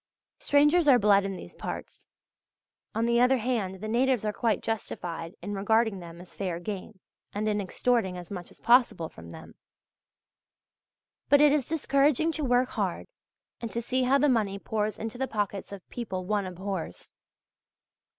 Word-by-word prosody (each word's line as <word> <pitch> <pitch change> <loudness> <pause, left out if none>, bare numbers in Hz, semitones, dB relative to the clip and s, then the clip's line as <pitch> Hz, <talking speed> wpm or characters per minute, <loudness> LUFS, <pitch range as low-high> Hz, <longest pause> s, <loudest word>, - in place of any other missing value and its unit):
Strangers 295 +3 +4
are 265 -3 +8
bled 200 -3 +4
in 195 -1 -3
these - - -10
parts; - - -7 0.9
on 225 +1 +1
the 235 0 +3
other 255 +2 +5
hand 215 -6 -2
the 215 - -4
natives 245 0 +2
are 210 - 0
quite 225 0 0
justified 175 -6 -4
in 205 - -4
regarding 220 +1 +1
them 170 -1 -10
as 180 - -12
fair 180 -4 -3
game 195 +2 -6 0.3
and 210 +1 -2
in 210 -1 +1
extorting 195 -1 0
as 175 0 -9
much 180 -3 -6
as - - -15
possible 235 -9 +4
from 85 0 -12
them. - - -11 1.8
But 285 - +6
it 295 0 +6
is 285 -4 +1
discouraging 300 0 +2
to 315 -1 -3
work 250 -1 +2
hard - - -2 0.5
and 230 - -4
to 230 - -3
see 255 +2 -1
how 255 +2 +4
the 295 - +3
money 215 -7 +1
pours 215 +1 -2
into 225 +2 -6
the 265 - 0
pockets 205 -4 -3
of 200 -3 -9
people 190 -6 -5
one 205 -1 0
abhors. 185 - -5
215 Hz, 170 wpm, -28 LUFS, 195-250 Hz, 1.8 s, are